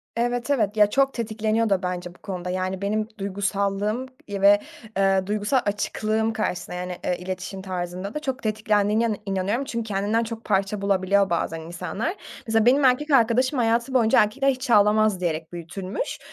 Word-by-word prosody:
Evet, 240 +2 -1
evet. 220 -6 +1
Ya, 210 -1 +6
çok 270 +4 +2
tetikleniyor 220 -1 0
da 195 -1 +1
bence 180 -1 -4
bu - - -21
konuda, 180 -2 -5
yani, 185 +1 -2
benim 215 +2 -1
duygusallığım, 200 +3 -1 0.2
iii, 200 -1 -4
ve, 200 +1 +7 0.4
eee, 195 -1 +2
duygusal 210 +5 +1
açıklığım 215 +2 -1
karşısında, 180 -6 -3
yani, 180 0 -4
eee, 180 - 0
iletişim 185 +1 -5
tarzında 185 +1 -4
da - - -2
çok 265 -4 -4
tetiklendiğine 215 0 +1
inan 215 -3 -1
inanıyorum 195 +6 -1
çünkü 235 -4 -3
kendinden 210 +3 0
çok 230 0 -6
parça 195 0 0
bulabiliyor 200 0 +2
bazen 165 -1 -1
insanlar. 180 - -4 0.3
Mesela, 225 0 +2
benim 270 +3 +5
erkek 275 +4 +3
arkadaşım 255 +2 +3
hayatı 235 +2 +1
boyunca, 230 -4 +4
"Erkekler 270 +6 0
hiç 255 0 -2
ağlamaz" 210 -1 +4
diyerek 160 -1 -2
büyütülmüş 175 +3 -5
205 Hz, 165 wpm, -24 LUFS, 190-230 Hz, 0.4 s, ve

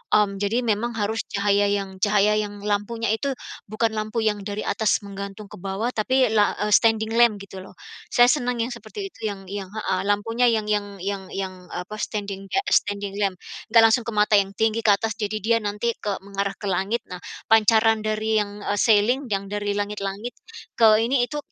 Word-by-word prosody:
mmm, 200 -2 +2
jadi 225 +5 +1
memang 230 +1 -1
harus 220 +2 -1 0.2
cahaya 200 0 +2
yang 195 -2 -3
cahaya 210 0 +4
yang 205 -1 -4
lampunya 210 +2 -1
itu, 275 +4 -2 0.4
bukan 220 +2 0
lampu 215 +2 -2
yang 210 -1 +1
dari 205 +1 -4
atas 215 0 +1
menggantung 200 +1 -7
ke - - -9
bawah 195 +5 -3
tapi 255 +4 +2
la 210 -2 +3
eee, 210 - -1
standing 225 -1 +3
lamp 235 -2 +5
gitu 190 -1 -10
loh. 190 - -14 0.4
Saya 245 0 +6
senang 250 -4 -1
yang 245 - -4
seperti 235 - -7
itu - - -21
yang 195 -2 -6
yang 200 -2 -4
heeh 210 -3 -2
lampunya 225 +4 +2
yang 215 -2 -1
yang 205 -1 -1
yang 195 -1 -3
yang, 190 -1 -4 0.2
eee, - - -4
apa 215 - -7
standing, 200 -3 -4
kayak 390 - 0
standing 200 -1 0
lamp. 195 -2 0 0.4
Enggak 230 0 +7
langsung 240 - +2
ke - - -2
mata 210 0 +4
yang 195 0 -1
tinggi 220 0 +1
ke 210 - +5
atas, 220 +1 -3
jadi 215 0 -2
dia 230 +1 +3
nanti 210 +3 -1
ke 205 -2 -3
mengarah 200 0 -3
ke 205 - -5
langit 200 +6 -1
nah. 180 - -6 0.3
Pancaran 225 0 +5
dari 215 0 0
yang 205 0 -4 0.2
ceiling, 240 +5 +3
yang 200 -1 -1
dari 205 0 -2
langit-langit, 205 +2 -4 0.5
ke 225 - +7 0.2
ini 245 +1 +2
itu 295 - -5
210 Hz, 195 wpm, -23 LUFS, 200-225 Hz, 0.5 s, Enggak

